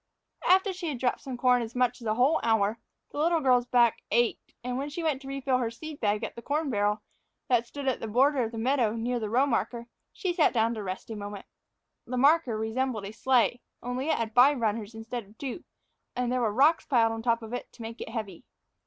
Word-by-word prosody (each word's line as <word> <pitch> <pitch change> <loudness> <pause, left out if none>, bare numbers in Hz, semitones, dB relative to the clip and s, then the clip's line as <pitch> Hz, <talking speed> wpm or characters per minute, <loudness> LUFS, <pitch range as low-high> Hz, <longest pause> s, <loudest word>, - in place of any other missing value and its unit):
After 380 +2 +4
she 360 -2 -5
had 290 -5 -2
dropped 245 0 -1
corn 250 0 +3
as 230 +1 -6
much 250 0 +1
as 230 - -6
a 215 - +1
whole 265 +7 +3
hour, 220 -1 +1 0.3
the - - -5
little 330 +2 +3
girl's 250 -4 +3
back 240 -2 +3
ached, 235 +1 0
and 250 +1 -2
when 280 +2 -3
she 330 +3 -5
went 295 -4 0
to 270 - -10
refill 270 -2 0
her 235 -2 0
seed 305 +6 -9
bag 210 0 0
at 225 - -4
the 235 - -8
corn 290 +2 -1
barrel 205 -1 0 0.5
that 240 -2 +2
stood 285 +1 -6
on 260 - +1
the 225 - -5
border 265 +5 +3
of 225 - -3
the 230 - -7
meadow 240 -2 +1
near 240 +2 -1
the 215 -2 -3
row 250 +5 +3
marker, 235 -2 -1 0.3
she 365 -2 -2
sat 335 -6 +3
down 230 -1 +2
to 220 - -5
rest 190 +3 -6
a - - -4
moment. 205 -1 -7 0.6
The 250 +1 -3
marker 275 -3 +4
resembled 220 0 -2
a 200 - -6
sleigh, 245 0 +2 0.2
only 250 +4 -3
it - - +2
had 225 -1 -3
five 260 +3 +6
runners 220 -1 -2
instead 230 +2 -5
of 210 +2 -21
two, 275 +4 -6 0.5
and 245 -1 -1
there 255 0 +1
were 225 -3 +1
rocks 290 +9 +4
piled 230 -5 +3
on 225 0 -4
top 230 0 +1
of 225 +2 -8
it 245 - -5
to 235 - -10
make 230 +1 -7
it - - -5
heavy. 215 -6 -6
245 Hz, 235 wpm, -28 LUFS, 225-270 Hz, 0.6 s, five